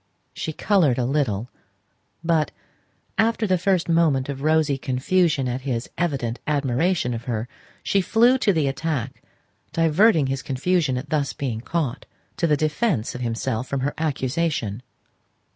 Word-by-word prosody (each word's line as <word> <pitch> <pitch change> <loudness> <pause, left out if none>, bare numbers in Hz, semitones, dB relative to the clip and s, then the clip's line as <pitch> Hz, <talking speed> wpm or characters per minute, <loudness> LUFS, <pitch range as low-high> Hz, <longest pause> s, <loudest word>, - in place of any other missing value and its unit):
She 160 - -4
coloured 160 - +2
a 125 - 0
little; 125 -5 -1 0.7
but, 165 -2 +2 0.7
after 225 0 +2
the 185 -3 +2
first 185 -1 +1
moment 155 -5 +2
of 135 -1 -4
rosy 155 -2 +2
confusion 140 +2 +1
at 125 +1 -2
his 125 -3 -3
evident 130 -9 -1
admiration 145 0 +1
of 115 +1 -6
her, 115 -1 -2 0.4
she 200 - +2
flew 240 +7 +4
to 210 - +3
the 160 -6 +1
attack, 135 -2 -3 0.5
diverting 165 +1 +4
his 135 0 -2
confusion 145 0 0
at 140 +3 -6
thus 145 -3 0
being 120 -5 -3
caught, 145 -2 -3 0.3
to 170 - +1
the 150 -2 +3
defence 155 - 0
of 125 - -6
himself 115 +1 -2
from 140 0 -2
her 145 +3 -1
accusation. 140 -6 -1
145 Hz, 145 wpm, -23 LUFS, 130-170 Hz, 0.7 s, flew